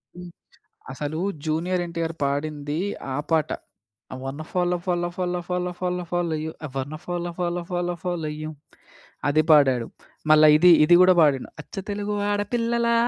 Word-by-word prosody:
హ్మ్. 180 0 -9 0.6
అసలు 150 +3 -4 0.3
'జూనియర్ 175 +3 0
ఎన్టీఆర్' 165 -1 -3
పాడింది 145 +1 -2 0.4
ఆ - - -1
పాట. 155 -2 +2 0.6
'అ - - -5
వనో 140 +4 -5
follow 180 -1 +1
follow 175 -1 0
follow 180 -1 -1
follow 180 0 -1
follow 180 0 -2
follow 175 -2 0
you 160 - -3 0.2
I - - -7
వాన 140 +3 -3
follow 175 0 -3
follow 175 0 -1
follow 175 0 -1
follow 175 -4 -2
you' 155 0 -5 0.8
అది 155 +2 +3
పాడాడు. 130 -6 +5 0.5
మళ్ళా 155 0 +7
ఇది, 180 +2 +7
ఇది 175 - +6
కూడా 185 0 +6
పాడిండు. 140 -4 +2
'అచ్చ - - -18 0.2
తెలుగు 205 0 -2 0.2
ఆడపిల్లలా. 235 +3 0
175 Hz, 150 wpm, -24 LUFS, 155-180 Hz, 0.8 s, మళ్ళా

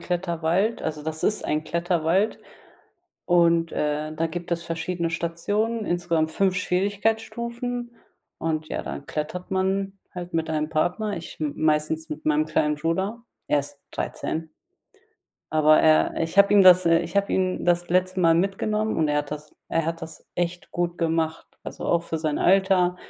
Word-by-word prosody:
Kletterwald 175 +4 0
also, 155 -1 -3
das 160 +1 -4
ist 210 - 0
ein 155 +1 0
Kletterwald 170 +4 +1 0.9
und, 170 -1 +4
äh, 150 +1 -1
da 165 +1 0
gibt 175 +1 -6
es 170 0 -1
verschiedene 170 0 -2
Stationen, 205 +7 -1
insgesamt 170 -2 0
5 190 -2 +1
Schwierigkeitsstufen 225 +5 -1 0.5
und 155 -1 -2
ja, - - -3
dann 70 +2 -7
klettert 160 +4 -4
man 195 +1 0 0.2
halt 175 -1 -7
mit 160 -1 0
einem 155 -1 -1
Partner. 180 +6 0
Ich 170 - -8
m 150 -2 -1
meistens 155 +1 0
mit 155 +1 -6
meinem 155 0 +3
kleinen 150 -1 +1
Bruder. 190 +9 -2 0.3
Er 145 - +3
ist 145 0 -10
13. 160 0 -4 1.0
Aber 155 0 +5
er 155 -1 +3
ich 165 +3 -4
habe 200 0 +7
ihm 205 -1 +7
das, 185 -1 +8
äh 165 0 +5
ich 170 +2 -5
habe 200 0 +2
ihn 185 -1 0
das 175 0 +2
letzte 185 +1 +1
Mal 165 -1 +5
mitgenommen 210 +4 0
und 155 -2 +2
er 150 0 +2
hat - - -4
das 150 0 -7
er 165 -1 0
hat 165 0 -3
das 160 -1 -9
echt 175 0 -3
gut 175 0 -2
gemacht. 165 -1 -1 0.2
Also, - - -6
auch 170 - +2
für 160 - -3
sein 155 -2 -1
Alter. 185 -1 +3
170 Hz, 165 wpm, -25 LUFS, 160-190 Hz, 1.0 s, das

